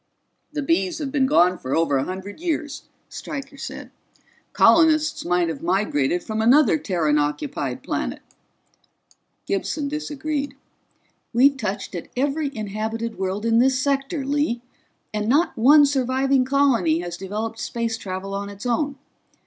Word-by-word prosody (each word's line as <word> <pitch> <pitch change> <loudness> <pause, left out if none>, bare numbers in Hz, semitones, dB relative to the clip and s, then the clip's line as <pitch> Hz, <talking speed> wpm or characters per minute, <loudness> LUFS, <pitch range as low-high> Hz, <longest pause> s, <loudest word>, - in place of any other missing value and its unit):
"The 300 -1 -3
Bees 335 +2 +1
have 290 -4 -4
been 265 -2 +2
gone 180 - +4
for 130 - -2
over 160 -4 +2
a 135 - 0
hundred 190 +5 -7
years," 310 -4 -3 0.2
Stryker 280 -2 -7
said. - - -7 0.6
"Colonists 310 -2 +4
might 175 0 +1
have 160 -4 -4
migrated 175 -3 0
from 220 0 -2
another 285 +7 +5
Terran 165 - +1
occupied 150 - -2
planet." - - -3 1.2
Gibson 295 -3 -2
disagreed. 295 -1 -3 0.8
"We've 275 +4 +5
touched 210 -7 -4
at 175 - -6
every 285 +2 0
inhabited 220 +2 -4
world 190 +3 -2
in 230 0 +3
this 260 +1 +3
sector, 275 +2 -1
Lee, 280 -4 0 0.5
and 210 +1 -1
not 300 +7 +2
one 290 +6 +7
surviving 265 -1 +1
colony 255 - +2
has 175 -1 -5
developed 215 +5 -5
space 230 -1 -2
travel 195 -2 -6
on 200 0 -4
its 200 +2 -10
own. 280 +4 0
240 Hz, 140 wpm, -23 LUFS, 195-285 Hz, 1.2 s, one